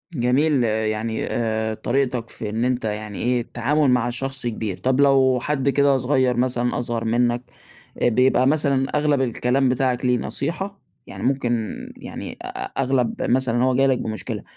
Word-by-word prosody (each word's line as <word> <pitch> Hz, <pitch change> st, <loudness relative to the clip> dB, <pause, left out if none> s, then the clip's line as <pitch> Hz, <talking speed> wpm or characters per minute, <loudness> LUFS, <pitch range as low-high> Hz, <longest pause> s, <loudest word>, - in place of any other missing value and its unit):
جميل، 130 Hz, +2 st, +2 dB
يعني 110 Hz, 0 st, -1 dB
آآ، 110 Hz, -1 st, -1 dB
طريقتك 125 Hz, -1 st, -1 dB
في 105 Hz, -, -5 dB
إن 115 Hz, +3 st, -1 dB
أنت 125 Hz, -2 st, -1 dB
يعني 105 Hz, -1 st, -4 dB
إيه 125 Hz, 0 st, +1 dB
التعامل 135 Hz, +5 st, 0 dB
مع 125 Hz, -1 st, +2 dB
شخص 135 Hz, +1 st, -1 dB
كبير، 110 Hz, -4 st, -3 dB
طَب 130 Hz, +8 st, 0 dB
لو 135 Hz, -2 st, +4 dB
حد 140 Hz, 0 st, 0 dB
كده 140 Hz, -1 st, +3 dB
صغير 130 Hz, -1 st, +1 dB
مثلًا 125 Hz, -1 st, 0 dB
أصغر 120 Hz, -1 st, -3 dB
منك 120 Hz, +1 st, +1 dB, 0.6 s
آآ -, -, +4 dB
بيبقى 125 Hz, +2 st, +3 dB
مثلًا 140 Hz, -3 st, +2 dB
أغلَب 150 Hz, -2 st, +2 dB
الكلام 130 Hz, +2 st, +1 dB
بتاعك 130 Hz, 0 st, 0 dB
ليه 125 Hz, 0 st, +3 dB
نصيحة؟ 195 Hz, +9 st, -3 dB, 0.3 s
يعني -, -, -8 dB
ممكن 120 Hz, -4 st, 0 dB, 0.2 s
يعني -, -, -8 dB
أ -, -, -8 dB, 0.4 s
أغلَب 125 Hz, -3 st, 0 dB
مثلًا 125 Hz, -1 st, +2 dB
هو 130 Hz, 0 st, +2 dB
جاي 135 Hz, +1 st, +4 dB
لك 130 Hz, -2 st, +2 dB
بمشكلة 110 Hz, -1 st, -4 dB
125 Hz, 160 wpm, -22 LUFS, 115-135 Hz, 0.6 s, لو